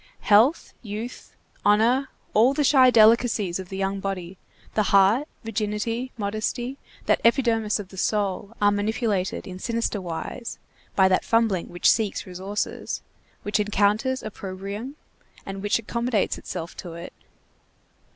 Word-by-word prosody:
Health, 230 Hz, +9 st, +4 dB
youth, 220 Hz, +2 st, -7 dB, 0.3 s
honor, 235 Hz, +6 st, +3 dB, 0.2 s
all 240 Hz, +6 st, +4 dB
the 295 Hz, -, +2 dB
shy 260 Hz, -2 st, +6 dB
delicacies 220 Hz, -5 st, +4 dB
of 185 Hz, -1 st, -8 dB
the 190 Hz, -, -5 dB
young 195 Hz, 0 st, -1 dB
body, 190 Hz, -2 st, -5 dB, 0.3 s
the 215 Hz, -, +2 dB
heart, 200 Hz, +9 st, +4 dB, 0.2 s
virginity, 225 Hz, +3 st, -2 dB
modesty, 220 Hz, +5 st, -3 dB, 0.3 s
that -, -, +2 dB
epidermis 230 Hz, -3 st, +2 dB
of 205 Hz, -3 st, -8 dB
the 190 Hz, -, -13 dB
soul, 205 Hz, +2 st, -1 dB
are 205 Hz, 0 st, +4 dB
manipulated 205 Hz, -2 st, -1 dB
in 185 Hz, -1 st, -8 dB
sinister 230 Hz, -2 st, -1 dB
wise 180 Hz, +7 st, -5 dB, 0.4 s
by 190 Hz, -1 st, +5 dB
that 185 Hz, -1 st, +2 dB
fumbling 225 Hz, -6 st, +1 dB
which 175 Hz, -, 0 dB
seeks 220 Hz, -4 st, -1 dB
resources, 190 Hz, +3 st, -4 dB, 0.4 s
which 205 Hz, +1 st, 0 dB
encounters 210 Hz, +5 st, +1 dB
opprobrium, 200 Hz, +5 st, -6 dB, 0.5 s
and 195 Hz, 0 st, -6 dB
which 205 Hz, +1 st, +2 dB
accommodates 235 Hz, -1 st, -1 dB
itself 170 Hz, -1 st, -6 dB
to 175 Hz, -3 st, -7 dB
it. 170 Hz, +1 st, -8 dB
210 Hz, 130 wpm, -25 LUFS, 195-230 Hz, 0.5 s, shy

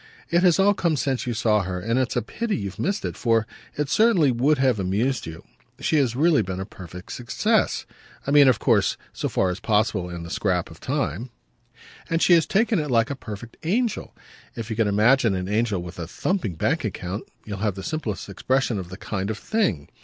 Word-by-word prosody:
It 170 Hz, +1 st, +4 dB
has 180 Hz, -3 st, +5 dB
all 200 Hz, +1 st, +5 dB
come 170 Hz, -5 st, +1 dB
since 130 Hz, -2 st, -1 dB
you 120 Hz, -, -1 dB
saw 110 Hz, -2 st, +2 dB
her, 90 Hz, -1 st, -3 dB
and 115 Hz, +7 st, 0 dB
it's 130 Hz, -1 st, -1 dB
a 120 Hz, -, +1 dB
pity 230 Hz, -, -2 dB
you've 100 Hz, -2 st, -5 dB
missed 195 Hz, +2 st, -1 dB
it, -, -, -3 dB
for 115 Hz, -2 st, +2 dB, 0.3 s
it 150 Hz, -1 st, 0 dB
certainly 190 Hz, -, +4 dB
would 135 Hz, +6 st, +2 dB
have 130 Hz, -5 st, +2 dB
amused 105 Hz, +6 st, 0 dB
you. 80 Hz, 0 st, -8 dB, 0.4 s
She 160 Hz, -, +1 dB
has 130 Hz, -5 st, +2 dB
really 155 Hz, 0 st, +4 dB
been 95 Hz, -2 st, -4 dB
a 95 Hz, -, -3 dB
perfect 90 Hz, 0 st, -10 dB
success 200 Hz, -, 0 dB, 0.4 s
I 140 Hz, -, -1 dB
mean 145 Hz, -1 st, +7 dB
of 130 Hz, -3 st, +5 dB
course -, -, +2 dB, 0.2 s
so -, -, -2 dB
far 95 Hz, -1 st, +1 dB
as 90 Hz, -, -5 dB
possible 105 Hz, -5 st, +1 dB
in 85 Hz, -1 st, -6 dB
the 85 Hz, -, -8 dB
scrap 90 Hz, -4 st, 0 dB
of -, -, -13 dB
time 110 Hz, -, -2 dB, 0.8 s
and 165 Hz, -1 st, +1 dB
she 175 Hz, -, +5 dB
has 165 Hz, -2 st, +4 dB
taken 215 Hz, +1 st, +2 dB
it 150 Hz, -1 st, -2 dB
like 115 Hz, 0 st, +2 dB
a -, -, -2 dB
perfect 115 Hz, -1 st, -9 dB
angel. 220 Hz, +7 st, -1 dB, 0.4 s
If 115 Hz, 0 st, -5 dB
you -, -, -1 dB
can 110 Hz, -1 st, +2 dB
imagine 110 Hz, +2 st, +4 dB
an 90 Hz, 0 st, -3 dB
angel 105 Hz, -3 st, 0 dB
with 90 Hz, 0 st, -9 dB
a 85 Hz, -, -4 dB
thumping 130 Hz, -, -2 dB
bank 155 Hz, -, 0 dB
account 95 Hz, -2 st, -4 dB, 0.2 s
you'll 100 Hz, -2 st, -5 dB
have 105 Hz, -2 st, 0 dB
the 95 Hz, -, -7 dB
simplest 135 Hz, -6 st, -3 dB
expression 125 Hz, +3 st, 0 dB
of 90 Hz, -2 st, -7 dB
the 95 Hz, -, -8 dB
kind 100 Hz, -1 st, -3 dB
of 110 Hz, -, -2 dB
thing. 105 Hz, -, -1 dB
115 Hz, 215 wpm, -24 LUFS, 95-150 Hz, 0.8 s, mean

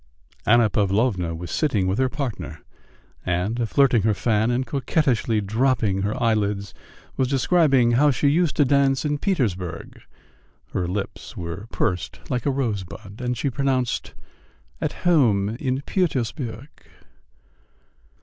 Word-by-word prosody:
Anna 120 Hz, 0 st, +6 dB
Pavlovna 100 Hz, -4 st, 0 dB
was 85 Hz, +1 st, -7 dB
sitting 115 Hz, -12 st, +1 dB
with 95 Hz, +4 st, 0 dB
her 130 Hz, -1 st, +2 dB
partner, 135 Hz, -4 st, -5 dB, 0.6 s
and, 105 Hz, +7 st, -1 dB
flirting 130 Hz, -4 st, +4 dB
her 110 Hz, +1 st, +2 dB
fan 110 Hz, +1 st, +1 dB
and 125 Hz, +2 st, 0 dB
coquettishly 130 Hz, -5 st, 0 dB
dropping 110 Hz, -2 st, +1 dB
her 105 Hz, +2 st, -1 dB
eyelids, 105 Hz, -4 st, 0 dB, 0.4 s
was 130 Hz, -, +2 dB
describing 135 Hz, -3 st, +3 dB
how 140 Hz, +5 st, +4 dB
she 140 Hz, +1 st, +1 dB
used 160 Hz, +1 st, +2 dB
to 145 Hz, -, +4 dB
dance 135 Hz, 0 st, +2 dB
in 150 Hz, -1 st, 0 dB
Petersburg 105 Hz, -, -2 dB, 0.7 s
(her 90 Hz, -, -1 dB
lips 100 Hz, +3 st, -5 dB
were 90 Hz, +5 st, -6 dB
pursed 90 Hz, -5 st, -2 dB
up -, -, -13 dB
like 125 Hz, +2 st, -1 dB
a -, -, +3 dB
rosebud, 105 Hz, -5 st, -4 dB
and 125 Hz, -1 st, -2 dB
she 135 Hz, +5 st, -1 dB
pronounced 130 Hz, -2 st, -1 dB, 0.7 s
"at -, -, -1 dB
home 115 Hz, -, +4 dB
in 130 Hz, +4 st, -2 dB
Pütürsburg"). 135 Hz, -, -2 dB
120 Hz, 130 wpm, -23 LUFS, 100-135 Hz, 0.7 s, Anna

